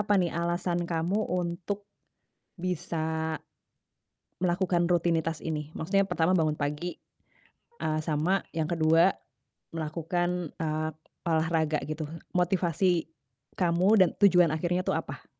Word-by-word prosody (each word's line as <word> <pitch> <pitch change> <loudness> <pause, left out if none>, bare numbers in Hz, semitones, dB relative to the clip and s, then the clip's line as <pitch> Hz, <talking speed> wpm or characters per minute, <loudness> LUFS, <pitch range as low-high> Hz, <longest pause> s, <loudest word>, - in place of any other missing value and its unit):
apa 205 -1 +2
nih 175 -3 +1
alasan 175 +1 -1
kamu 170 +5 0
untuk 180 +3 -2 0.7
bisa 160 -3 -2 1.0
melakukan 175 -1 +1
rutinitas 165 -2 +1
ini? 150 -1 -4
Maksudnya 195 +4 +1
pertama 180 0 +2
bangun 155 -1 +2
pagi, 150 +4 -3 0.9
eee, 155 0 0
sama 160 +5 +2 0.2
yang 160 0 -1
ke-2, 165 +2 +5 0.6
melakukan, 170 +2 -2
eee, 155 0 -1 0.4
olahraga 160 -1 +1
gitu. 155 0 -3 0.3
Motivasi 175 -1 +1 0.5
kamu 180 +1 +2
dan 185 - +6
tujuan 180 -5 +6
akhirnya 175 +3 -1
itu - - +1
apa? - - -5
170 Hz, 110 wpm, -28 LUFS, 160-180 Hz, 1.0 s, dan